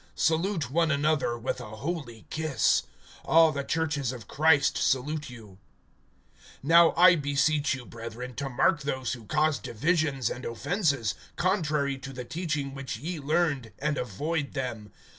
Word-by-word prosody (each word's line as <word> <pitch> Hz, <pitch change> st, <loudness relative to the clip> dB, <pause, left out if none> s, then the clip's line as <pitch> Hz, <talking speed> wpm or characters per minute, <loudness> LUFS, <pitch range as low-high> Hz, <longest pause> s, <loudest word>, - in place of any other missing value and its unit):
(16)Salute 165 Hz, -3 st, 0 dB
one 165 Hz, +2 st, +2 dB
another 145 Hz, -4 st, +1 dB
with 120 Hz, +1 st, -3 dB
a 110 Hz, -2 st, -8 dB
holy 120 Hz, -3 st, -5 dB
kiss. 155 Hz, -3 st, +2 dB, 0.4 s
All 165 Hz, -1 st, +5 dB
the 140 Hz, -1 st, -3 dB
churches 150 Hz, -5 st, -1 dB
of 120 Hz, -5 st, -9 dB
Christ 150 Hz, -2 st, +3 dB
salute 150 Hz, +3 st, 0 dB
you. 110 Hz, -6 st, -13 dB, 1.1 s
(17)Now 165 Hz, +2 st, +6 dB
I 180 Hz, 0 st, +8 dB
beseech 145 Hz, 0 st, +1 dB
you, 125 Hz, -2 st, -9 dB
brethren, 115 Hz, +2 st, -8 dB
to 140 Hz, 0 st, -3 dB
mark 150 Hz, +6 st, +2 dB
those 130 Hz, -4 st, -2 dB
who 115 Hz, -3 st, -9 dB
cause 155 Hz, +1 st, +1 dB
divisions 145 Hz, -1 st, 0 dB
and 125 Hz, -, -6 dB
offenses, 140 Hz, -, 0 dB, 0.2 s
contrary 150 Hz, -7 st, 0 dB
to 135 Hz, 0 st, -8 dB
the 125 Hz, -1 st, -6 dB
teaching 150 Hz, -3 st, -3 dB
which 135 Hz, -4 st, -5 dB
ye 160 Hz, +7 st, -5 dB
learned, 145 Hz, -6 st, 0 dB
and 150 Hz, +1 st, -1 dB
avoid 145 Hz, -, -3 dB
them. 115 Hz, -6 st, -4 dB
140 Hz, 145 wpm, -28 LUFS, 125-160 Hz, 1.1 s, I